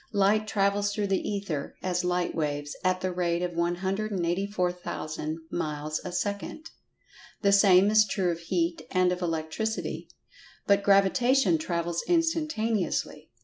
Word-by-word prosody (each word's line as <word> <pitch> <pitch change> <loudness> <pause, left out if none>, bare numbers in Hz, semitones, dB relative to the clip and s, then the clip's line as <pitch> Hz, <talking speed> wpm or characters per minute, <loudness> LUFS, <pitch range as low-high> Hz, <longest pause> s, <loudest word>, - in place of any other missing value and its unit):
Light 205 +2 +3
travels 205 0 +1
through 205 0 -1
the 195 -1 -1
Ether 195 -8 -4
(as 180 -1 0
light 180 0 0
waves) 145 -2 -2
at 185 0 +1
the 185 0 -1
rate 175 -1 0
of 175 -1 -2
184,000 180 -3 -2
miles 155 -2 -3
a 180 - -5
second. 200 - -4 0.7
The 200 - +4
same 200 0 +6
is 215 0 +5
true 190 -2 0
of 165 - -4
Heat 170 0 -1
and 185 -1 +2
of 180 0 -3
Electricity. 165 +6 -3 0.6
But 200 0 +4
Gravitation 200 - +3
travels 170 +1 -2
instantaneously. 230 - 0
185 Hz, 130 wpm, -27 LUFS, 170-205 Hz, 0.7 s, same